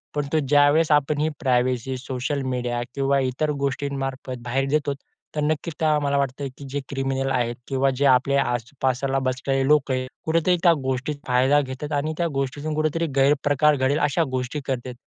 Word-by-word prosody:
पण 145 -1 0
तो 160 - +4
ज्यावेळेस 145 +3 +4
आपण 150 0 +2
ही 155 - +2
प्रायव्हसी 130 0 0
सोशल 130 +2 -3
मीडिया 120 -1 -2
किंवा 140 0 +2
इतर 130 +3 -1 0.2
गोष्टी 140 +1 -2
मार्फत 135 -1 -4
बाहेर 135 +3 0
देतोत 145 -1 0 0.4
तर 150 - 0
नक्कीच 155 +2 -2 0.2
मला 140 0 +1
वाटतं, 140 0 -1
की 140 - -9
जे 145 +2 -2
क्रिमिनल 135 -1 -1
आहेत 120 -2 0
किंवा 135 0 +1
जे 140 - +2
आपल्या 135 +1 +4
आसपासला 130 +2 -1
बसलेले 135 +1 -1
लोक 150 -2 +3
आहेत, 130 0 -1 0.2
कुठेतरी 165 +3 +2
त्या 170 -2 +7
गोष्टीत 130 +3 -2
फायदा 130 +4 +4
घेतात 135 +3 -6
आणि 150 +2 -1
त्या 170 - +1
गोष्टीतून 145 +3 -2
कुठेतरी 155 +2 0
गैरप्रकार 145 +2 +3
घडेल 135 +2 +1
अशा 150 +3 +2
गोष्टी 130 +3 -2
करतात. 130 -2 -3
135 Hz, 170 wpm, -23 LUFS, 130-145 Hz, 0.4 s, त्या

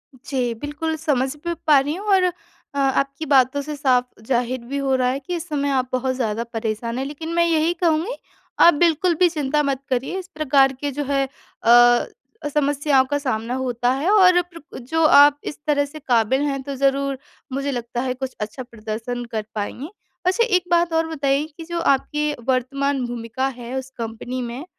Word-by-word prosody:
जी, 255 -2 -2
बिल्कुल 295 +2 -3
समझ 280 -3 0
भी 340 - 0
पा 295 -3 +7
रही 285 +2 -1
हूँ 405 +3 -7
और 375 - +3 0.5
अ, - - -6
आपकी 275 +2 0
बातों 270 -1 +3
से 300 +1 -5
साफ 260 -4 +2 0.2
ज़ाहिर 250 0 0
भी 275 +4 -4
हो 275 -1 0
रहा 255 -1 +1
है 265 +2 -1
कि 320 +6 -5
इस 340 0 -5
समय 285 -2 -1
आप 260 -2 +1
बहुत 260 0 -1
ज़्यादा 230 -3 -1
परेशान 225 +1 -3
हैं। 265 - -2
लेकिन 300 +3 -6
मैं 340 - +4
यही 330 0 +2
कहूँगी, 340 +6 0 0.4
आप 345 - +8
बिल्कुल 340 +2 +2
भी 365 - +6
चिंता 300 -2 0
मत 275 -2 -1
करिए 260 +8 -1
इस 370 - -9
प्रकार 275 -3 +3
के 290 -1 -1
जो 290 +2 -3
है 275 0 +1
अ, 240 - +2
समस्याओं 285 -2 +2
का 290 +2 -1
सामना 245 -4 -2
होता 245 -2 0
है, 285 +7 -1
और 365 -4 +6
प्र 335 -3 -12
जो 320 +7 -1
आप 290 -1 +7
इस - - -6
तरह 285 -1 +2
से 295 +2 -10
काबिल 250 -1 +2
हैं 280 -2 -1
तो 280 0 -5
ज़रूर 275 0 +1 0.4
मुझे 275 +1 -1
लगता 240 -1 -3
है 255 -1 -1
कुछ 260 0 -6
अच्छा 215 +5 -5
प्रदर्शन 230 +1 -5
कर 215 -2 -3
पाएँगी। 230 +8 -4 0.4
अच्छा 375 +6 +3
एक 365 - +2
बात 340 -1 +3
और 325 0 +1
बताइए 285 -2 0
कि 330 - -7
जो 340 +1 -3
आपकी 295 +1 +1 0.2
वर्तमान 270 +1 0
भूमिका 240 +2 -3
है 240 +1 -7
उस 265 0 -9
कंपनी 235 +2 -5
में 245 +5 -6
275 Hz, 195 wpm, -22 LUFS, 255-305 Hz, 0.5 s, आप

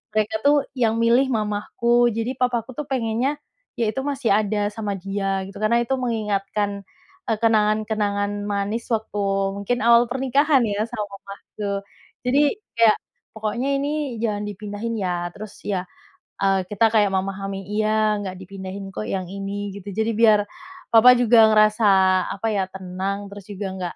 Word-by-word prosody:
mereka 215 0 +1
tuh 290 +1 +6 0.2
yang 225 -2 +2
milih 240 +4 +4
mamahku, 230 +2 +1
jadi 230 +3 -2
papahku 245 -1 0
tuh 300 - -3
pengennya 245 +2 0 0.4
yaitu 230 +3 0
masih 280 -4 -1
ada 205 0 +1
sama 210 -1 -3
dia 195 0 -2
gitu, 200 - -11
karena 235 +2 +3
itu 265 +3 -1
mengingatkan, 205 -4 -2 0.4
eee, 225 - +1
kenangan-kenangan 215 -2 +1 0.2
manis 205 +3 -2
waktu 220 -1 -2 0.4
mungkin 220 +5 -1
awal 235 0 +6
pernikahan 270 +2 +3
ya 205 +1 -1
sama 210 - -3
mamahku. 200 0 -6 0.4
Jadi 255 +3 +3 0.4
kayak 230 -2 +5 0.4
pokoknya 220 +4 -2
ini 285 -3 -2
jangan 210 -3 -1
dipindahin 205 +3 -5
ya 175 -2 -2
terus 215 +1 -9
ya, 190 -3 -1 0.6
eee, 195 -1 +3
kita 210 +2 +2
kayak 210 -2 +4
memahami, 195 +1 -3
"Iya, 215 0 +1
nggak 190 -2 -5
dipindahin 190 +1 -7
kok 105 - -4
yang 185 -2 -3
ini" 200 +1 -4
gitu, 200 0 -10
jadi 220 +1 +1
biar 215 -1 +5 0.5
papah 235 +2 +8
juga 240 -1 +4
ngerasa, 215 +1 +4 0.5
apa 210 +3 -3
ya, 195 - +1
tenang 190 +2 -4
terus 200 0 -9
juga 200 0 -4
enggak 180 -2 -5
215 Hz, 150 wpm, -22 LUFS, 200-230 Hz, 0.6 s, papah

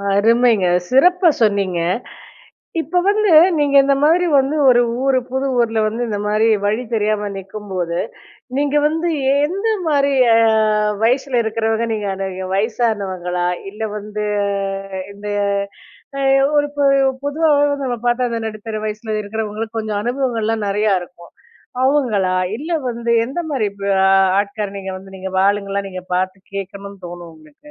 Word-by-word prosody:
அருமைங்க! 225 -2 +3 0.2
சிறப்பா 355 +7 +4
சொன்னீங்க. 200 -4 +1 1.0
இப்போ 320 +4 -1
வந்து 420 -1 +2 0.3
நீங்க 285 -1 +2
இந்த 275 - +3
மாதிரி 335 +4 +4 0.4
ஒரு 245 -1 +6 0.2
ஊரு 270 -1 +3
புது 265 +1 -1
ஊர்ல 225 -2 +1
வந்து 225 +3 -2
இந்த 205 -1 -2
மாதிரி 215 +2 +2 0.2
வழி 215 +4 0
தெரியாம 210 -1 0
நிக்கும் 200 +2 -9
போது, 175 -2 -2 0.6
நீங்க 290 0 0
வந்து 325 +3 -1 0.3
எந்த 370 +10 0 0.2
மாரி 280 -2 +2 0.2
அ - - +5 0.7
வயசுல 255 +1 +2
இருக்குறவங்கள 225 +1 -1
அணுகுவீங்க? 195 -3 -3
வயசானவங்களா? 195 -5 -1 0.2
இல்ல 210 +2 -9
வந்து 210 0 -5 0.9
இந்த 205 +1 -8 0.9
அ - - -2 0.4
ஒரு 290 - +3
பொ 290 - 0 0.4
பொதுவாவே 290 0 +2 0.2
நம்ம 245 -2 -2
பார்த்தா 245 +1 +1
அந்த 230 - -2
நடுத்தர 215 0 -6
வயசுல 215 0 -4
இருக்குறவங்களுக்கு 220 +1 -5
கொஞ்சம் 215 -2 -2
அனுபவங்கள்லாம் 230 -4 -1
நெறைய 205 -1 +1
இருக்கும். 170 -1 -15 0.5
அவங்களா? 220 -10 +1 0.2
இல்ல 315 +4 -7 0.2
வந்து 235 0 -4 0.2
எந்த 275 +8 -4
மாரி 240 -8 0
வ 200 0 +1 0.5
ஆட்கார 205 0 -4
நீங்க 190 -1 -6
வந்து 195 0 -14
நீங்க 190 0 -6 0.2
ஆளுங்கள்லாம் 200 -1 -2
நீங்க 185 -1 -7
பாத்து 185 +1 -1 0.2
கேக்கணும்னு 200 0 -7
தோணும் 175 -1 -9
உங்களுக்கு? 155 - -18
220 Hz, 130 wpm, -18 LUFS, 200-260 Hz, 1.0 s, ஒரு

